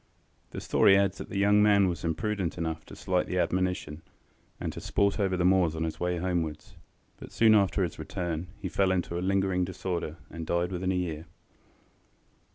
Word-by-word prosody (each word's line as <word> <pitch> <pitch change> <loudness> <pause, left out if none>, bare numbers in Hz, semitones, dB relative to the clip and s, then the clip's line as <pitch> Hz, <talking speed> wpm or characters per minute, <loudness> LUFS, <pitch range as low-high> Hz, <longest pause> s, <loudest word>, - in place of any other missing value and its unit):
The - - -6
story 95 -1 +4
adds 100 -1 +1
that - - -7
the 100 - -4
young 105 +1 +4
man 100 -2 +5
was 85 -1 -3
imprudent 90 +2 -2
enough 80 -1 -3
to - - -10
slight - - -1
the - - -2
admonition, 90 -4 -1 0.6
and - - -4
to - - -7
sport 100 +1 +1
over 95 -2 +1
the 90 - +1
moors 90 -3 +3
on 80 - -2
his 80 -1 -4
way 90 0 -1
homewards, 85 -3 -3 0.4
but - - -11
soon 110 -1 +5
after 100 -1 +3
his 85 - -4
return 85 -1 -4
he 100 -2 -5
fell 95 +1 +1
into 90 -2 -1
a - - -4
lingering 95 -1 +1
disorder, 90 -3 -4
and 80 0 -7
died 85 +1 0
within 90 +1 -1
a - - 0
year. 85 -3 -3
90 Hz, 190 wpm, -28 LUFS, 85-95 Hz, 0.6 s, man